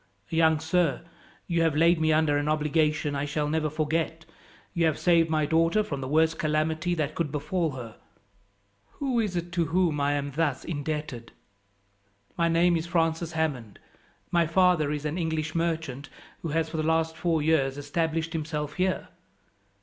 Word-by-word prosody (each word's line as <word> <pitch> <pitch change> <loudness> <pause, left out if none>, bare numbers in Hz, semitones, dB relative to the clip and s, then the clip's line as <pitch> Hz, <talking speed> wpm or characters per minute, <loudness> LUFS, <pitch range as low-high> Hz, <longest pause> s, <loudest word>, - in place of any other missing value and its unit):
"Young 160 -1 +3
sir, 160 -1 +1 0.4
you 170 -2 0
have 165 -3 +2
laid 165 +1 +4
me 160 0 +3
under 155 -1 +3
an 145 +1 0
obligation 150 -1 +1
I 140 +1 -1
shall 150 +1 -1
never 155 0 0
forget. 160 +1 -2 0.5
You 170 -1 +2
have 155 - 0
saved 165 -2 +3
my 155 -1 +1
daughter 165 +7 +2
from 140 -9 -5
the 130 - -4
worst 160 +3 +2
calamity 155 +3 0
that 155 -2 -2
could 160 -4 -2
befall 160 +1 -1
her. 120 -4 -8 1.0
Who 265 -4 -1
is 210 -5 -1
it 175 0 -3
to 170 -1 +1
whom 165 -2 +1
I 145 +1 +2
am 145 0 -2
thus 145 -2 -1
indebted?" 150 -6 -4 1.0
"My 170 -1 +2
name 170 +1 +3
is 165 +1 -2
Francis 165 -1 0
Hammond. 140 -10 -2 0.5
My 170 -2 +3
father 175 -3 +3
is 150 0 -3
an 155 +4 -2
English 160 -2 -2
merchant 160 -5 -2 0.3
who - - -4
has, 160 +1 0
for 160 - -5
the - - +1
last 160 +1 +1
four 165 -2 0
years, 145 -4 +2
established 160 +3 -2
himself 150 -2 -3
here." 185 0 0
160 Hz, 170 wpm, -27 LUFS, 150-165 Hz, 1.0 s, laid